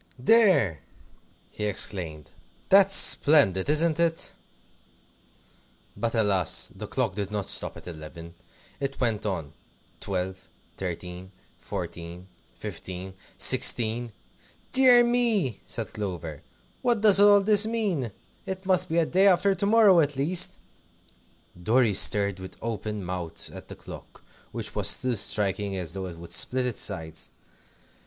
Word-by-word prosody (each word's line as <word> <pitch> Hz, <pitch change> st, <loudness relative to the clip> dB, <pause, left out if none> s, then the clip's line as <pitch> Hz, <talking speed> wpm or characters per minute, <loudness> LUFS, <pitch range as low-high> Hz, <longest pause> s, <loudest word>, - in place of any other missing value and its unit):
"There!" 140 Hz, -, +3 dB, 0.7 s
he 105 Hz, -, -5 dB
exclaimed; 85 Hz, -7 st, -1 dB, 0.4 s
"that's 195 Hz, 0 st, +5 dB
splendid, 140 Hz, -, +5 dB
isn't 155 Hz, +1 st, +2 dB
it?" 165 Hz, -1 st, -1 dB, 1.6 s
But 115 Hz, 0 st, -3 dB
alas! 100 Hz, -6 st, 0 dB
the -, -, -8 dB
clock 95 Hz, -, -2 dB
did 100 Hz, -1 st, -5 dB
not 105 Hz, -2 st, -4 dB
stop -, -, -5 dB
at -, -, -13 dB
eleven. 85 Hz, 0 st, -10 dB, 0.5 s
It 135 Hz, 0 st, -5 dB
went 115 Hz, -4 st, -1 dB
on 80 Hz, -7 st, -5 dB, 0.5 s
Twelve, 95 Hz, -1 st, -5 dB, 0.3 s
Thirteen, 90 Hz, 0 st, -7 dB, 0.3 s
Fourteen, 85 Hz, +2 st, -8 dB, 0.3 s
Fifteen, 95 Hz, +1 st, -8 dB, 0.2 s
Sixteen! 115 Hz, +1 st, +3 dB, 0.6 s
"Dear 250 Hz, -2 st, +6 dB
me!" 230 Hz, -, -1 dB
said -, -, -5 dB
Clover, 85 Hz, -8 st, -6 dB, 0.4 s
"what 240 Hz, -4 st, 0 dB
does 205 Hz, -2 st, +7 dB
all 205 Hz, 0 st, +6 dB
this 210 Hz, +1 st, +4 dB
mean? 200 Hz, -, -2 dB, 0.4 s
It 190 Hz, 0 st, -6 dB
must 185 Hz, -1 st, +2 dB
be 165 Hz, 0 st, +1 dB
day 190 Hz, +5 st, +2 dB
after 195 Hz, +1 st, +3 dB
to 190 Hz, +1 st, -3 dB
morrow, 210 Hz, -4 st, +5 dB
at 145 Hz, -2 st, 0 dB
least." 155 Hz, +7 st, +1 dB, 1.0 s
Dorry 115 Hz, +3 st, +2 dB
stared 100 Hz, 0 st, +2 dB
with 95 Hz, 0 st, -11 dB
open 105 Hz, -3 st, -5 dB
mouth 90 Hz, -2 st, -6 dB
at -, -, -11 dB
the -, -, -10 dB
clock, -, -, -13 dB, 0.3 s
which -, -, -7 dB
was -, -, -1 dB
still 125 Hz, -1 st, +1 dB
striking 100 Hz, -1 st, 0 dB
as 85 Hz, -4 st, -6 dB
though 95 Hz, -1 st, -6 dB
it 85 Hz, -2 st, -10 dB
would 85 Hz, 0 st, -12 dB
split 125 Hz, +9 st, +2 dB
its 125 Hz, -3 st, -3 dB
sides. 80 Hz, -6 st, -4 dB
110 Hz, 130 wpm, -25 LUFS, -, 1.6 s, does